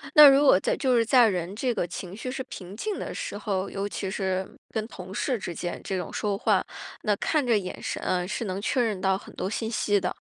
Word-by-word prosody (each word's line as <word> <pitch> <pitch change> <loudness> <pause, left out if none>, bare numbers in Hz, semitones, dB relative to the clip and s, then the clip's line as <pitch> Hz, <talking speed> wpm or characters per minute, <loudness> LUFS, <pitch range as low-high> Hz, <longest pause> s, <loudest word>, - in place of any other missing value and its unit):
那 300 -1 +12
如 275 +1 +5
果 265 - +7
在 - - 0
就 260 -3 +2
是 230 -1 +4
在 245 0 +6
人 180 -1 -2
这 250 +2 0
个 180 - -1
情 180 +1 -7
绪 250 +4 -5
是 265 - -4
平 195 -8 -9
静 420 - -3
的 - - -4
时 205 - -4
候， 195 -2 -2
尤 200 +1 -3
其 195 -1 -4
是 190 -1 -1 0.2
跟 220 -1 -2
同 185 -4 -9
事 250 +4 0
之 175 -3 -5
间 175 +1 -4
这 190 - -2
种 180 - -4
说 205 -2 -1
话， - - +2 0.4
那 210 - +3
看 305 +4 +1
着 235 -3 +4
眼 185 -2 -5
神 - - -3
啊 180 -1 0
是 210 +4 -3
能 190 0 -3
确 250 +4 +1
认 215 -5 -1
到 190 0 +2
很 - - -13
多 190 - -2
信 220 +1 -2
息 205 -2 +2
的。 - - -2
205 Hz, 270 characters per minute, -27 LUFS, 190-240 Hz, 0.4 s, 那